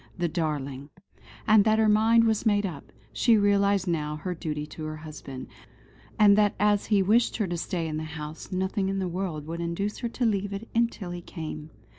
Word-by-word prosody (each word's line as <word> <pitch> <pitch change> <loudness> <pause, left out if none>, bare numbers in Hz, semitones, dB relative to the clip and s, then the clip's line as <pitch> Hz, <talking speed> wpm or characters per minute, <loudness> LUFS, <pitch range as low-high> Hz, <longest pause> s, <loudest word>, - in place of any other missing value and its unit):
The 175 -1 0
darling! 145 -4 -3 0.6
And 215 -2 +6
that 215 +1 +3
her 220 0 +3
mind 220 +2 +5
was 220 -2 +1
made 205 -2 +2
up. 160 -7 -7 0.2
She 225 - +4
realised 200 -1 +2
now 150 -3 -1
her 180 +4 -4
duty 150 -3 -4
to 155 +1 -9
her 155 0 -4
husband; 150 -4 -8 0.7
and 205 -1 +7
that 205 -1 +3
as 205 0 +2
he 205 -3 +3
wished 225 +5 +3
her 215 - 0
to 175 -2 -3
stay 170 -1 -3
in 155 -1 -3
the 155 - -3
house, 155 0 -8
nothing 190 +1 -1
in 195 - -1
the 190 -1 -1
world 175 -4 -4
would 165 +2 -5
induce 170 +5 -3
her 235 - -2
to 245 +1 -2
leave 205 -2 0
it 205 +4 -6 0.2
till 185 -6 -8
he 175 0 -6
came. 155 -3 -7
185 Hz, 205 wpm, -27 LUFS, 155-205 Hz, 0.7 s, and